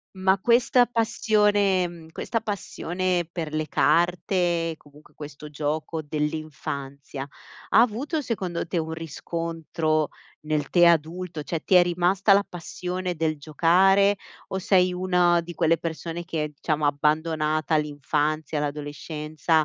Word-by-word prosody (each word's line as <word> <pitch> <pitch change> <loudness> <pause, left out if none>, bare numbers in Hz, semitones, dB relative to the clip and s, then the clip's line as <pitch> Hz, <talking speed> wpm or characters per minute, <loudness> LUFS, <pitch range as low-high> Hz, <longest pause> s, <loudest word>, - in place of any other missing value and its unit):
Ma 190 +1 +2
questa 245 +1 +4
passione 210 -5 +2
mhmm, 170 -2 -11
questa 230 +7 -2
passione 185 -4 -2
per 165 -3 -5
le 155 0 -1
carte, 175 -1 +1
comunque 150 0 -20
questo 150 0 -9
gioco 155 +2 -3
dell'infanzia, 145 -2 -4 0.5
ha - - +6
avuto, 255 +8 +1
secondo 185 -11 -3
te, 175 +1 -4
un 160 0 -3
riscontro 165 -1 -2 0.4
nel 150 -3 -1
te 175 -1 +5
adulto? 165 0 0
Cioè 165 +1 -3
ti - - +1
è 175 - +7
rimasta 180 +3 +2
la 200 +1 +5
passione 180 +1 -4
del 155 -1 -1
giocare 185 +7 +4 0.3
o 190 - -3
sei 185 -1 +3
una 180 -1 +3
di 175 0 -9
quelle 165 +1 +2
persone 165 +1 -5
che 165 -3 -2
è 150 - -3
diciamo 155 -2 0
abbandonata 155 +1 +1
all'infanzia, 150 +1 -1
l'adolescenza, 150 +2 -1
165 Hz, 130 wpm, -25 LUFS, 155-185 Hz, 0.5 s, è